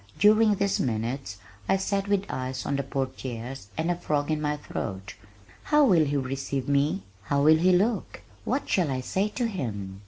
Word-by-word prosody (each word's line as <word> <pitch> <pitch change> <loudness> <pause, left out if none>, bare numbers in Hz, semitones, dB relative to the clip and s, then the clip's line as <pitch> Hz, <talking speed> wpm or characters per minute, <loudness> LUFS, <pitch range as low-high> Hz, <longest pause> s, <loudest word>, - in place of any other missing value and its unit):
During 215 +1 +5
these 200 0 0
minutes 115 -1 -2 0.3
I - - +4
sat 195 +1 -1
with 200 -1 +1
eyes 130 0 -4
on 140 - 0
the 140 - 0
portieres 130 -3 -5
and 165 +2 0
a - - 0
frog 150 -3 -1
in 155 -1 0
my 150 0 0
throat. 95 -9 -5 0.5
"How 300 -1 +5
will 175 - +5
he 145 0 0
receive 135 0 -3
me? 140 -7 +1 0.2
How 140 +5 +1
will 155 +1 +7
he 185 +3 +4
look? 205 +5 0 0.2
What 280 - -1
shall 175 -6 +2
I 130 -1 -1
say 190 +10 0
to 240 +3 -2
him?" 100 - -4
145 Hz, 185 wpm, -27 LUFS, 130-190 Hz, 0.5 s, will